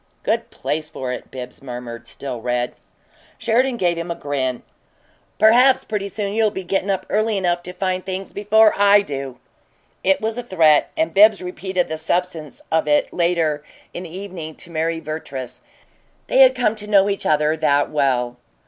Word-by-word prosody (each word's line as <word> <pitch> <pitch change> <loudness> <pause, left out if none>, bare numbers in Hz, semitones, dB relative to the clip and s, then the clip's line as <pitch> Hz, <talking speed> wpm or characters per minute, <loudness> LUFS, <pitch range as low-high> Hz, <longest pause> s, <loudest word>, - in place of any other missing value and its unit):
"Good - - -1
place 150 +3 -3
for 130 -5 -5
it," - - -8
Bibbs 125 -1 -9
murmured, 120 -2 -8
still 125 -1 -7
red. 120 +1 -1 0.6
Sheridan 245 +2 +1
gave 175 -4 +1
him 170 +1 -5
a 170 - -2
grin. 135 -4 -3 0.7
"Perhaps 245 +5 +5
pretty 205 -2 -3
soon 200 0 -3
you'll 220 0 +3
be 190 -2 -6
gettin' 195 +2 -1
up 190 -1 -1
early 215 0 +1
enough 175 -2 0
to 180 - -8
find 185 0 -2
things 190 0 -5
before 215 +1 +4
I 205 0 +5
do!" 135 -5 -6 0.7
It 190 0 +3
was 220 +1 -2
a - - -2
threat, 165 -10 +3
and 320 0 0
Bibbs 210 +1 +6
repeated 185 0 -2
the 160 0 -4
substance 165 -2 -3
of 160 -1 +1
it, 150 0 +2
later 165 -4 +1 0.3
in - - -5
the 175 0 -8
evening, 175 -5 -7
to 170 - -11
Mary 165 0 -1
Vertrees 145 -5 -6 0.6
they - - +1
had 260 -1 +7
come 245 -4 +1
to 210 0 -7
know 200 -2 +4
each 200 -1 -1
other 150 +1 +2
that 145 -2 +2
well. 125 -5 0
175 Hz, 175 wpm, -21 LUFS, 145-200 Hz, 0.7 s, had